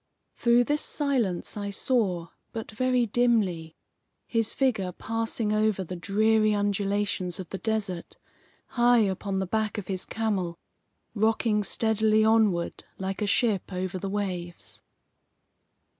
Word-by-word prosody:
Through 235 0 +4
this 295 +4 0
silence 255 - 0
I 205 -1 -3
saw, 195 -6 0 0.2
but 225 -1 -5
very 250 +2 +1
dimly, 205 -9 +1 0.5
his 225 -2 +1
figure 220 -9 0
passing 225 +2 -2
over 215 -2 +1
the 180 +1 -6
dreary 215 +4 +2
undulations 200 -3 0
of 185 - -7
the 195 - -5
desert, 210 -6 -3 0.5
high 240 0 +4
upon 195 -1 -1
the 190 - 0
back 215 +3 -1
of 210 - -4
his 190 0 -2
camel, 195 -7 -2 0.6
rocking 220 0 +2
steadily 220 0 +2
onward 215 -6 +2
like 190 +2 -4
a 210 - +1
ship 205 -2 +1
over 185 0 -3
the 195 - -4
waves. 180 -4 -4
210 Hz, 130 wpm, -27 LUFS, 190-225 Hz, 0.6 s, Through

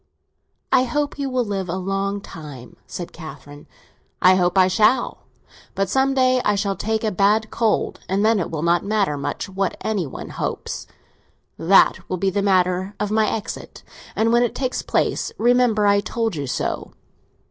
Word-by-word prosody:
"I 255 - +4
hope 290 +3 -2
you 275 -1 -1
will 255 -2 0
live 195 -3 -3
a 175 - -1
long 195 +2 -2
time," 145 -9 -10
said 175 - -7
Catherine. 145 -3 -11 0.5
"I 185 - +6
hope 180 0 +1
I 185 -1 +6
shall! 215 +6 +1 0.5
But 195 -1 0
some 270 0 +2
day 255 -1 +3
I 210 - +2
shall 200 -1 -1
take 220 +2 -2
a 215 - +1
bad 210 +3 +2
cold, 225 -2 0
and 195 +3 +1
then 220 -1 +3
it 175 - -2
will 155 -1 -4
not 170 0 +2
matter 200 -6 0
much 145 +5 -4
what 195 0 -2
any 205 -7 -1
one - - -8
hopes. - - -4 0.7
That 195 +4 +4
will 185 - -1
be 195 +2 0
the 200 +2 0
manner 185 0 +1
of 210 0 -2
my 215 0 +2
exit, 220 - -6 0.3
and 225 +1 +2
when 240 - +5
it 240 - 0
takes 255 -2 -2
place, - - 0
remember 240 -2 +3
I 200 0 +4
told 225 -1 -2
you 145 -2 -4
so. - - -3
200 Hz, 180 wpm, -22 LUFS, 185-225 Hz, 0.7 s, I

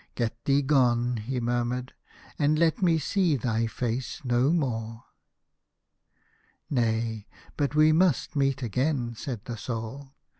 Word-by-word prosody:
"Get 115 -1 -3
thee 140 +1 +3
gone," 125 -4 +2
he 125 +4 -3
murmured, 120 +2 -2 0.5
"and 150 +1 +3
let 165 +6 +2
me 170 -3 +4
see 170 +1 +1
thy 115 -2 0
face 120 +2 -3
no 125 +2 +2
more." 115 -7 -2 0.8
" - - -41
Nay, 115 -4 0 0.3
but 145 -1 -1
we 155 +1 +6
must 165 -3 +2
meet 135 -1 +1
again," 125 +2 -1
said 120 -1 -6
the 120 - -5
Soul. 125 +5 -6
125 Hz, 135 wpm, -27 LUFS, 115-145 Hz, 0.8 s, we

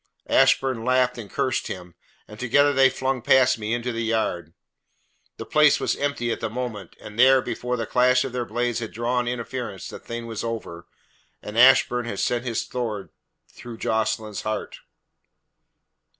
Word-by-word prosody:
Ashburn 130 -4 +3
laughed 125 0 +1
and 105 -4 -8
cursed 130 - -1
him, 90 -2 -8 0.3
and 105 - -12
together 140 +4 +3
they 135 -1 +5
flung 130 -1 -2
past 130 -1 +4
me 105 0 -4
into 120 +1 -1
the 115 0 -3
yard. 90 -8 -2 0.8
The - - -7
place 150 -1 +4
was - - 0
empty 140 -5 -2
at - - -3
the 110 - -3
moment, 110 -5 -6
and 105 +2 -11
there, 130 +1 +7
before 125 0 -3
the 115 - -2
clash 125 +2 +3
of 130 - -6
their 125 -1 -1
blades 120 0 -1
had 115 -2 -6
drawn 120 +2 -1
interference, 120 -4 -5
the - - -8
thing 115 0 -7
was 115 -2 -5
over 110 -7 -6 0.6
and 105 - -8
Ashburn 125 0 +5
had 100 -4 -5
sent 120 0 -1
his 115 -3 -2
sword 110 -6 -4 0.4
through 120 -2 -11
Jocelyn's 110 -1 -1
heart." 110 -1 -4
120 Hz, 165 wpm, -24 LUFS, 110-125 Hz, 0.8 s, there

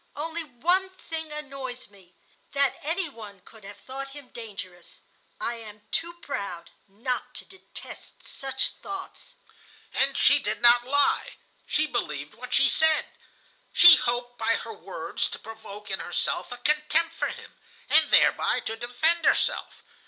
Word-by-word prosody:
Only 325 +3 -3
one 350 +8 +1
thing 325 -4 -7
annoys 270 -6 -7
me,—that 200 +8 -3
any 335 +4 -1
one 215 -8 -11
could 220 +3 -17
have 200 +1 -10
thought 270 +4 -7
him 280 -3 -12
dangerous. 190 -6 -9 0.4
I 235 - -2
am 210 -2 -11
too 340 +1 0
proud 175 -9 -5 0.2
not 235 +6 -4
to - - -3
detest 380 - -11
such 265 -1 0
thoughts.' 390 +5 -8 0.6
"And - - +2
she - - +6
did - - -2
not 240 0 +6
lie. 285 +1 +2 0.3
She 305 - +2
believed 150 - -3
what 250 +3 -10
she 275 - +5
said. 315 +3 +3 0.6
She 345 -2 +10
hoped 245 -1 -2
by 225 0 +2
her - - -5
words - - -4
to - - -6
provoke 210 -2 -10
in 190 - -2
herself 175 - -2
a 245 - -5
contempt 305 +5 +1
for - - -1
him, - - -9 0.3
and - - +5
thereby - - +4
to 225 - -3
defend 250 +9 0
herself. - - +1
250 Hz, 145 wpm, -27 LUFS, 220-305 Hz, 0.6 s, She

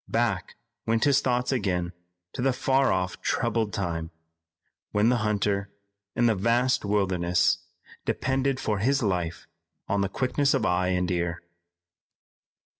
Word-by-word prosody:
Back - - 0 0.3
went 115 0 +2
his 140 -2 +4
thoughts 125 0 0
again 90 -8 -1 0.4
to - - -4
the 135 0 +2
far 135 +1 +2
off 90 0 -1
troubled 110 -3 0
time, 85 -4 -3 0.8
when 105 +2 +3
the 125 - +3
hunter 100 -2 0 0.5
in 120 - +2
the 115 - +4
vast 120 +6 +2
wilderness 90 -4 +2 0.4
depended 135 0 0
for 105 -6 -1
his 135 +5 +2
life 90 -5 -1 0.4
on 100 0 +1
the 100 - 0
quickness 135 +5 +1
of - - 0
eye 90 +1 +1
and 90 0 0
ear. 85 -1 -2
105 Hz, 135 wpm, -26 LUFS, 90-125 Hz, 0.8 s, his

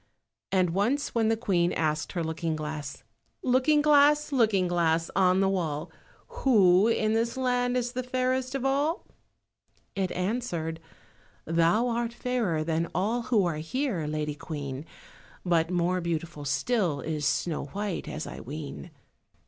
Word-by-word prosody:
And 185 -3 +2
once 235 - 0
when 225 -2 +2
the 225 0 +2
Queen 180 -6 +1
asked 155 0 -1
her 175 - -1
looking 160 0 -2
glass— 150 -3 -6 0.4
"Looking 265 +4 +3
glass, 295 0 +5
Looking 215 -8 +3
glass, 165 -1 +1
on 185 0 +4
the 195 - +3
wall, 160 -6 -2 0.5
Who 200 -6 +5
in 220 -1 +1
this 230 +2 0
land 250 -1 +1
is 245 -1 -1
the 255 0 -3
fairest 255 +1 -1
of 270 -1 -2
all?" 285 +5 0 0.9
it 190 -2 -1
answered— 180 -5 -2 0.7
"Thou 170 +8 +2
art 235 0 -1
fairer 230 -13 -1
than 165 +1 -1
all 215 +7 0
who 215 -6 +3
are 165 -3 -1
here, 175 - -2
Lady 150 0 -2
Queen." 145 -2 -6 0.6
But 165 -2 +2
more 180 0 +1
beautiful 165 -3 -4
still 155 - 0
is 155 -2 -3
Snow 155 +2 0
white, 200 +5 -4
as 155 - -5
I - - -8
ween." 150 +5 -7
185 Hz, 145 wpm, -28 LUFS, 160-245 Hz, 0.9 s, glass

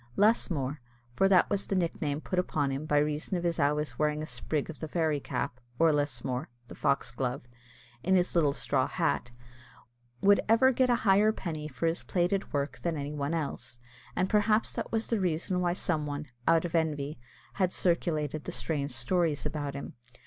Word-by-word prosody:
Lusmore, 155 - +2 0.3
for 195 +9 +3
that 190 -2 +5
was 200 -1 0
the 195 - -1
nickname 155 -4 -1
put 185 - -1
upon 145 -6 0
him 140 +3 -4
by 150 - +2
reason 150 +5 0
of 175 - -4
his 170 -1 0
always 150 +1 0
wearing 150 0 +1
a - - -3
sprig 155 -2 -2
of 160 - -8
the 160 - -4
fairy 155 -2 0
cap, 125 -2 -3 0.2
or 165 -1 +4
lusmore 130 -3 -1 0.2
(the - - -7
foxglove), 125 -1 -1 0.6
in 190 +6 +2
his 180 -1 +2
little 155 -5 +3
straw - - 0
hat, 120 - 0 0.9
would 200 +3 +5
ever 230 +4 +6
get 255 0 +2
a 245 - +5
higher 205 +2 +5
penny 155 -7 -5
for 140 +2 -4
his 165 +2 +1
plaited 180 +2 0
work 145 0 -2
than 170 -2 -2
any 145 +1 -4
one 145 +2 -1
else, 140 -5 -4 0.4
and 185 - +1
perhaps 215 +2 +2
that - - -4
was 225 0 0
the 230 - 0
reason 180 +1 0
why 175 -1 +1
some 155 -4 -1
one, 145 +1 -4 0.2
out 165 0 +4
of 170 - -5
envy, 150 -4 -1 0.4
had 185 -1 +3
circulated 155 -5 0
the - - -4
strange 145 -3 -2
stories 145 +4 0
about 145 -3 -3
him. 140 - -6
155 Hz, 185 wpm, -30 LUFS, 145-180 Hz, 0.9 s, ever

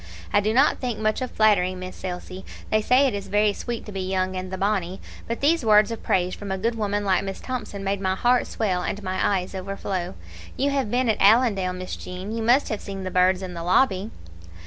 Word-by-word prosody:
I 205 - +6
do 210 +1 0
not 265 +6 +3
think 245 -4 -2
much 215 +3 0
of 255 - -2
flattery, 195 -4 +3
Miss 185 0 -8
Elsie 185 +1 -6 0.3
they 215 - +3
say 255 +5 +4
it 260 - +1
is 200 -1 -5
very 210 0 +2
sweet 235 +2 -5
to 210 - -8
the 195 -1 -4
young 185 0 -1
and 185 0 -5
the 190 - -3
bonnie 190 -2 -1 0.3
but 230 - -3
these 305 +1 +3
words 210 -1 +5
of 230 - -5
praise 180 0 +1
from 200 -1 -6
a 190 - -1
good 230 +5 0
woman 205 -2 -1
like 190 0 +2
Miss 195 -1 -5
Thomson 215 -6 -5
made 195 0 -1
my 190 -1 0
heart 245 +5 +2
swell 190 -5 -1
and 200 +3 -4
my 185 0 -2
eyes 180 +1 -5
overflow. 190 -1 -4 0.4
You 280 +2 +1
have 275 -6 0
been 245 +2 +1
at 220 - +1
Allendale, 200 -3 +4
Miss 185 0 -5
Jean; 185 +3 -7
you 230 - -2
must 245 +5 +3
have 215 - -3
seen 195 -1 -6
the 185 - -4
birds 185 +1 +3
in 180 -1 -6
the 170 - -6
lobby." 190 +3 +2
200 Hz, 235 wpm, -24 LUFS, 185-225 Hz, 0.4 s, I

